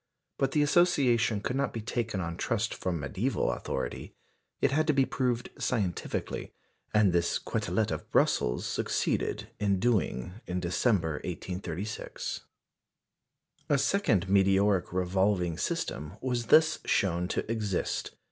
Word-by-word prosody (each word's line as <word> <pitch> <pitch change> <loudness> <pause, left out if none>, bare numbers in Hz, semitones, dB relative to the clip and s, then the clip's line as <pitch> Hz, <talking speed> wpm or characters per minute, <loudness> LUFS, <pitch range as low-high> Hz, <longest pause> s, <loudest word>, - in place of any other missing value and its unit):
But 135 0 +1
the 150 - +4
association 135 - +3
could 125 - -2
not 140 0 0
be 115 - -3
taken 115 -3 -2
on 85 -1 -3
trust 115 +5 -1
from 90 -3 -2
mediæval 70 -1 -1
authority. - - -4 0.4
It - - +2
had 155 +3 +2
to 155 - +4
be 135 -1 +4
proved 125 -3 -1
scientifically, 100 -8 -2 0.4
and 105 -4 +4
this 85 -1 +2
Quetelet - - -1
of - - -5
Brussels - - +2
succeeded - - -1
in 100 -2 +1
doing 100 - 0
in 90 0 -2
December, 85 -3 +1
1836. 90 +3 -5 1.2
A 145 - +4
second 125 - +2
meteoric 95 0 +3
revolving 90 -1 +1
system 75 +1 -2
was 120 -3 -2
thus 160 0 +5
shown 90 -2 +1
to 110 - -2
exist. 105 -5 -2
100 Hz, 130 wpm, -29 LUFS, 90-120 Hz, 1.2 s, thus